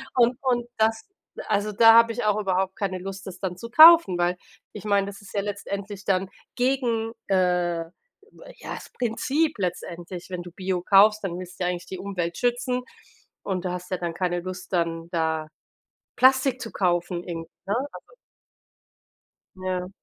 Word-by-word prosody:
Und 240 Hz, 0 st, +4 dB
und 245 Hz, -3 st, 0 dB
das 220 Hz, 0 st, +1 dB, 0.4 s
also 210 Hz, 0 st, 0 dB
da 225 Hz, +2 st, +7 dB
habe 230 Hz, 0 st, +6 dB
ich 230 Hz, -1 st, -3 dB
auch 210 Hz, -1 st, +2 dB
überhaupt 190 Hz, -1 st, 0 dB
keine 195 Hz, -3 st, -3 dB
Lust, 195 Hz, +1 st, -7 dB
das 185 Hz, -2 st, -8 dB
dann 185 Hz, -2 st, -3 dB
zu 230 Hz, +5 st, -8 dB
kaufen, 320 Hz, -, +8 dB
weil 175 Hz, +1 st, +1 dB, 0.4 s
ich 210 Hz, -, -8 dB
meine 200 Hz, -1 st, +2 dB
das 200 Hz, 0 st, -9 dB
ist 200 Hz, -, -14 dB
ja 200 Hz, -, 0 dB
letztendlich 200 Hz, 0 st, -5 dB
dann 190 Hz, -1 st, +1 dB, 0.3 s
gegen, 245 Hz, -3 st, 0 dB, 0.2 s
äh 180 Hz, -3 st, +1 dB, 0.7 s
ja, -, -, -6 dB
das -, -, -11 dB
Prinzip 275 Hz, +6 st, -1 dB
letztendlich. 180 Hz, -1 st, -5 dB
Wenn 180 Hz, -1 st, -5 dB
du 175 Hz, -, -10 dB
Bio 185 Hz, 0 st, -2 dB
kaufst, 210 Hz, +3 st, +5 dB
dann 180 Hz, -2 st, -3 dB
willst 185 Hz, 0 st, -10 dB
du -, -, -1 dB
ja 180 Hz, -, +1 dB
eigentlich 175 Hz, -1 st, -6 dB
die 190 Hz, -, -6 dB
Umwelt 180 Hz, -3 st, -4 dB
schützen 250 Hz, +1 st, 0 dB, 0.6 s
und 190 Hz, -2 st, -3 dB
du 180 Hz, -, -1 dB
hast 180 Hz, 0 st, -6 dB
ja 185 Hz, -, 0 dB
dann 175 Hz, -1 st, -3 dB
keine 175 Hz, 0 st, -1 dB
Lust, 185 Hz, +1 st, -8 dB
dann 165 Hz, -1 st, -1 dB
da 160 Hz, -2 st, -1 dB, 0.7 s
Plastik 260 Hz, 0 st, +4 dB
zu 225 Hz, -, -7 dB
kaufen 175 Hz, -1 st, 0 dB
irgend 165 Hz, -2 st, -6 dB, 0.2 s
ne? 200 Hz, -, 0 dB, 0.2 s
Also -, -, -13 dB, 1.4 s
Ja. 185 Hz, -1 st, -3 dB
190 Hz, 170 wpm, -25 LUFS, 180-225 Hz, 1.4 s, kaufen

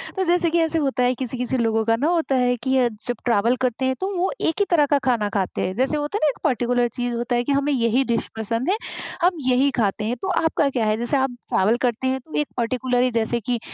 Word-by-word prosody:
तो 380 Hz, -, 0 dB
जैसे 345 Hz, -1 st, +2 dB
कि 340 Hz, +1 st, +1 dB
ऐसे 325 Hz, 0 st, +1 dB
होता 270 Hz, -3 st, 0 dB
है 250 Hz, +1 st, +3 dB
किसी-किसी 255 Hz, 0 st, -3 dB
लोगों 225 Hz, -1 st, +1 dB
का 225 Hz, 0 st, +3 dB
ना 280 Hz, +7 st, 0 dB
होता 330 Hz, -6 st, +1 dB
है 245 Hz, -1 st, +2 dB
कि 265 Hz, 0 st, +1 dB
अ, 250 Hz, -2 st, +4 dB, 0.2 s
जब 245 Hz, -, -1 dB
ट्रैवल 235 Hz, +1 st, +3 dB
करते 255 Hz, +1 st, 0 dB
हैं 260 Hz, 0 st, +1 dB
तो 380 Hz, -, -1 dB
वो 360 Hz, +2 st, 0 dB
एक 320 Hz, -, +1 dB
ही 405 Hz, -, +3 dB
तरह 310 Hz, -5 st, +4 dB
का -, -, +6 dB
खाना 225 Hz, -5 st, +1 dB
खाते 195 Hz, -3 st, -1 dB
हैं, 185 Hz, -, -3 dB
जैसे 265 Hz, +5 st, +1 dB
होता 295 Hz, +7 st, -2 dB
है -, -, -3 dB
ना -, -, +5 dB
एक -, -, -5 dB
पर्टिकुलर 245 Hz, -3 st, +1 dB
चीज़ 245 Hz, -1 st, -2 dB
होता 240 Hz, +1 st, -1 dB
है 240 Hz, -, +1 dB
कि 285 Hz, -, -2 dB
हमें 280 Hz, +1 st, +1 dB
यही 240 Hz, +1 st, +2 dB
डिश 235 Hz, -2 st, -1 dB
पसंद 230 Hz, -, -2 dB
है, 400 Hz, -, +3 dB, 0.5 s
हम 355 Hz, +2 st, +5 dB, 0.2 s
यही 260 Hz, +2 st, +3 dB
खाते 210 Hz, -1 st, 0 dB
हैं 240 Hz, +3 st, -1 dB
तो 385 Hz, -, -3 dB, 0.2 s
आपका 300 Hz, -3 st, +2 dB
क्या 240 Hz, -5 st, -1 dB
है? 215 Hz, 0 st, +1 dB
जैसे 240 Hz, +4 st, 0 dB
आप 265 Hz, -1 st, +1 dB, 0.2 s
ट्रैवल 215 Hz, +5 st, +2 dB
करते 245 Hz, +2 st, -1 dB
हैं 265 Hz, 0 st, 0 dB
तो 315 Hz, -, -9 dB
एक 295 Hz, -, 0 dB
पर्टिकुलर 250 Hz, +1 st, 0 dB
ही 255 Hz, -, +1 dB
जैसे 230 Hz, +1 st, 0 dB
कि 240 Hz, +1 st, -2 dB
250 Hz, 265 wpm, -22 LUFS, 235-280 Hz, 0.5 s, का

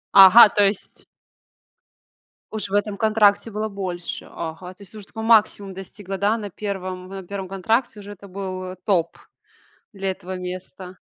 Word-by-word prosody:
Ага, 195 Hz, +4 st, +10 dB
то 205 Hz, 0 st, +3 dB
есть 195 Hz, 0 st, -3 dB, 1.5 s
уж 220 Hz, -2 st, -4 dB
в 195 Hz, -, -9 dB
этом 205 Hz, 0 st, 0 dB
контракте 215 Hz, 0 st, +3 dB
было 215 Hz, +1 st, -3 dB
больше. 185 Hz, -4 st, -5 dB
Ага. 170 Hz, +3 st, -7 dB
То 200 Hz, -, -15 dB
есть 200 Hz, +2 st, -15 dB
уже 210 Hz, -, -9 dB
такой 220 Hz, 0 st, -7 dB
максимум 210 Hz, -3 st, +3 dB
достигла, 195 Hz, 0 st, -7 dB
да, 210 Hz, +3 st, +1 dB
на 205 Hz, -2 st, -6 dB
1, 185 Hz, -2 st, -5 dB
на 195 Hz, 0 st, -8 dB
1 195 Hz, +1 st, -6 dB
контракте 220 Hz, +4 st, 0 dB
уже 205 Hz, 0 st, -10 dB
это 200 Hz, 0 st, -12 dB
был, 185 Hz, -1 st, -5 dB
э, 185 Hz, 0 st, -7 dB
топ 175 Hz, -5 st, +1 dB, 0.8 s
для 195 Hz, -1 st, -3 dB
этого 185 Hz, 0 st, -6 dB
места. 185 Hz, 0 st, -8 dB
195 Hz, 160 wpm, -22 LUFS, 185-210 Hz, 1.5 s, Ага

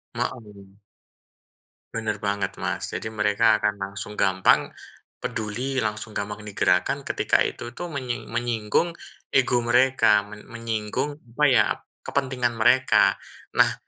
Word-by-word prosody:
Hooh. 105 Hz, -5 st, -6 dB, 1.1 s
Benar 110 Hz, -2 st, -2 dB
banget, 100 Hz, -1 st, -1 dB
Mas. -, -, -2 dB
Jadi 110 Hz, -, -3 dB
mereka 105 Hz, +1 st, +3 dB
akan 105 Hz, -, +1 dB
langsung 100 Hz, +1 st, -5 dB
gampang, 95 Hz, -2 st, +3 dB, 0.5 s
peduli, 125 Hz, +5 st, -2 dB
langsung 110 Hz, 0 st, -3 dB
gampang 105 Hz, +1 st, -4 dB
digerakkan 105 Hz, -, +1 dB
ketika -, -, +1 dB
itu, 120 Hz, +1 st, -3 dB
tuh, 175 Hz, +4 st, -6 dB
menying 130 Hz, -6 st, -4 dB
menyinggung 120 Hz, +7 st, 0 dB, 0.4 s
ego 125 Hz, -2 st, +3 dB
mereka, 125 Hz, -3 st, +4 dB
men 105 Hz, 0 st, -11 dB
menyinggung 115 Hz, +5 st, -3 dB, 0.2 s
apa, 150 Hz, +4 st, +2 dB
ya, 125 Hz, -4 st, +5 dB, 0.4 s
kepentingan 130 Hz, -3 st, -1 dB
mereka. 120 Hz, +3 st, +4 dB, 0.4 s
Nah, -, -, +5 dB
110 Hz, 115 wpm, -24 LUFS, 105-125 Hz, 1.1 s, ya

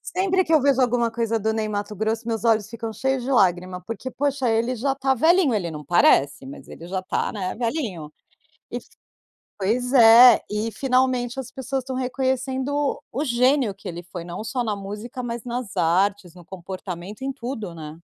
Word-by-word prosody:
Sempre 375 Hz, 0 st, +2 dB
que 325 Hz, -, 0 dB
eu 310 Hz, -, +5 dB
vejo 275 Hz, -1 st, +3 dB
alguma 240 Hz, -1 st, +2 dB
coisa 230 Hz, 0 st, -1 dB
do 220 Hz, 0 st, 0 dB
Ney 220 Hz, -1 st, -1 dB
Matogrosso 215 Hz, +2 st, -3 dB
meus 225 Hz, -1 st, -2 dB
olhos 220 Hz, -2 st, +2 dB
ficam 230 Hz, -1 st, -6 dB
cheios 265 Hz, +2 st, -1 dB
de 260 Hz, -, -4 dB
lágrima, 180 Hz, -4 st, +2 dB
porque, 230 Hz, +3 st, -6 dB
poxa, 275 Hz, -2 st, -1 dB
ele 230 Hz, +3 st, +1 dB
já 270 Hz, +3 st, -1 dB
tá 270 Hz, -1 st, +1 dB
velhinho, 320 Hz, +1 st, +3 dB
ele 180 Hz, -5 st, -1 dB
não 150 Hz, -2 st, -7 dB
parece, 140 Hz, -4 st, +3 dB
mas 135 Hz, -, -10 dB
ele 170 Hz, -, -10 dB
já 185 Hz, +1 st, -3 dB
tá, 185 Hz, -, -2 dB
né, 190 Hz, -4 st, -3 dB
velhinho. 225 Hz, -, -3 dB, 0.6 s
E -, -, -3 dB, 0.8 s
pois 235 Hz, +6 st, -1 dB
é, 235 Hz, -1 st, +9 dB
e 210 Hz, +2 st, -2 dB
finalmente 255 Hz, +1 st, 0 dB
as 255 Hz, -1 st, -7 dB
pessoas 265 Hz, 0 st, -3 dB
estão 260 Hz, 0 st, -5 dB
reconhecendo 265 Hz, +2 st, -1 dB
o 285 Hz, -, -2 dB
gênio 250 Hz, -3 st, +2 dB
que 195 Hz, -, -11 dB
ele 175 Hz, -1 st, -6 dB
foi 175 Hz, 0 st, -8 dB
não 175 Hz, +4 st, -6 dB
só 245 Hz, +2 st, -2 dB
na 215 Hz, -2 st, -1 dB
música, 210 Hz, +6 st, -7 dB
mas 235 Hz, -1 st, -4 dB
nas 240 Hz, -4 st, -5 dB
artes, 180 Hz, +2 st, +1 dB
no 175 Hz, -, -13 dB
comportamento, 185 Hz, +2 st, -8 dB
em 275 Hz, -, -1 dB
tudo, 235 Hz, -8 st, -6 dB
né. 155 Hz, -1 st, -9 dB
230 Hz, 185 wpm, -23 LUFS, 195-260 Hz, 0.8 s, é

